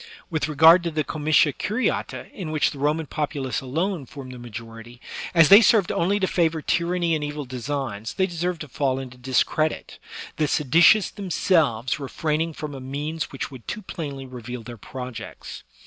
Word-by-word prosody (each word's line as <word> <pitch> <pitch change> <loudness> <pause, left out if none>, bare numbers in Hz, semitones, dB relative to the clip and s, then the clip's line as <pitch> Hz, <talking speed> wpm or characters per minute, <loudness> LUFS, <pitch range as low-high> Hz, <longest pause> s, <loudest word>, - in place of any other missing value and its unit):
With 160 -2 0
regard 160 +4 +7
to 170 - -2
the 155 -1 -1
com 150 0 -6
itia 150 -1 +5
curiata^ 225 +5 -2
in 180 -6 -6
which 155 -1 +1
the 140 - -9
Roman 150 +3 +1
populace 140 -5 -3
alone 160 +3 -2
formed 135 -2 -9
the 125 - -9
majority, 115 0 -10 0.4
as 165 -2 +7
they 200 +3 +10
served 215 -5 +4
only 200 +4 +1
to 190 - +2
favor 165 -3 +1
tyranny 170 0 +1
and 155 -2 0
evil 145 0 -4
designs, 125 -4 -4
they 190 - +2
deserved 175 -1 -3
to 155 - -6
fall 135 -1 -1
into 125 -2 -8
discredit, 135 +5 0 0.4
the 155 - +1
se 150 - 0
ditious 170 +9 +5
themselves 160 - +1
refraining 155 +3 -2
from 150 -1 -6
a 135 - -7
means 145 +4 -4
which 135 - -5
would 125 -4 -12
too 215 - -5
plainly 140 -7 -6
reveal 125 -1 -7
their 120 +1 -8
projects. 125 +1 -8
150 Hz, 180 wpm, -24 LUFS, 130-165 Hz, 0.4 s, they